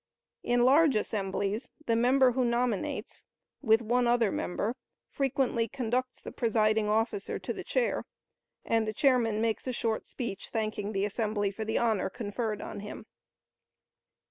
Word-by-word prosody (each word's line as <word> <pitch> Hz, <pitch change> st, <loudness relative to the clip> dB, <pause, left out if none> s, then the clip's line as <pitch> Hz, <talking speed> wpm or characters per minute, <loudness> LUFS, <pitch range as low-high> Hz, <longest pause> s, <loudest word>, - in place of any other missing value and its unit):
In 245 Hz, 0 st, +2 dB
large 285 Hz, +1 st, +5 dB
assemblies, 205 Hz, +2 st, -2 dB, 0.2 s
the 230 Hz, -, +2 dB
member 255 Hz, +2 st, +4 dB
who 255 Hz, +1 st, +1 dB
nominates, 235 Hz, -3 st, -1 dB, 0.4 s
with 225 Hz, -3 st, +4 dB
one 240 Hz, +2 st, +2 dB
other 235 Hz, -4 st, +3 dB
member, 210 Hz, +6 st, -2 dB, 0.4 s
frequently 260 Hz, -4 st, 0 dB
conducts 255 Hz, +1 st, -2 dB
the -, -, -7 dB
presiding 215 Hz, -2 st, +2 dB
officer 225 Hz, -, 0 dB
to -, -, -4 dB
the -, -, -7 dB
chair, -, -, 0 dB, 0.6 s
and 225 Hz, -1 st, +1 dB
the 215 Hz, -, -2 dB
chairman 240 Hz, -6 st, +3 dB
makes 225 Hz, +2 st, -1 dB
a 255 Hz, -, -1 dB
short 225 Hz, -2 st, -2 dB
speech, 220 Hz, -6 st, -5 dB
thanking 215 Hz, -2 st, -2 dB
the 195 Hz, 0 st, +1 dB
assembly 210 Hz, -1 st, -1 dB
for 220 Hz, +2 st, -5 dB
the 220 Hz, -, 0 dB
honor 220 Hz, -6 st, +1 dB
conferred 215 Hz, +1 st, -3 dB
on -, -, -6 dB
him. 210 Hz, +1 st, -8 dB
225 Hz, 145 wpm, -29 LUFS, 215-245 Hz, 0.6 s, large